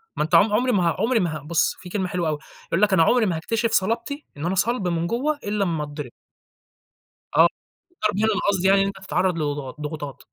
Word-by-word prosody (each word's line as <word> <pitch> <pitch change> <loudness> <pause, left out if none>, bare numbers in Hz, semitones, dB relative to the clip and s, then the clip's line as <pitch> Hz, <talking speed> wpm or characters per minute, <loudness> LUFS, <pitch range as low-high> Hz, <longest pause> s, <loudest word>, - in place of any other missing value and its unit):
ما - - 0
أنت 155 - +1
عم 205 +1 +5
عُمري 250 +3 +2
ما 195 -5 +2
ه - - -1
عُمري 235 +1 +2
ما 165 -5 -1
ه - - -8
بُص، 165 +2 +1
في 180 -1 -10
كلمة 190 -1 -1
حلوة 175 -3 -1
أوي 150 - -1 0.3
يقول 170 - 0
لك: 210 -2 +4
"أنا 165 - +5
عُمري 240 +5 +3
ما 180 -5 0
هاكتشف 225 +7 -1
صلابتي، 235 +9 -1
إن 150 - -4
أنا 185 - 0
صلب 205 0 0
من 170 0 -1
جوّا 265 +8 0
إلّا 205 0 0
أمّا 165 -5 -1
اتضرب." 145 -3 -7 1.2
آه، - - +7 0.5
الضرب 210 - -1
هنا 220 0 +2
أنا 205 - 0
قصدي 190 -1 +1
يعني 195 0 +5
إن - - +1
أنت 195 -1 -5
تتعرّض 180 -1 +1
لض 145 -2 -1
ضغ 135 -3 -5
ضغوطات. 150 -2 -5
190 Hz, 240 wpm, -23 LUFS, 160-215 Hz, 1.2 s, آه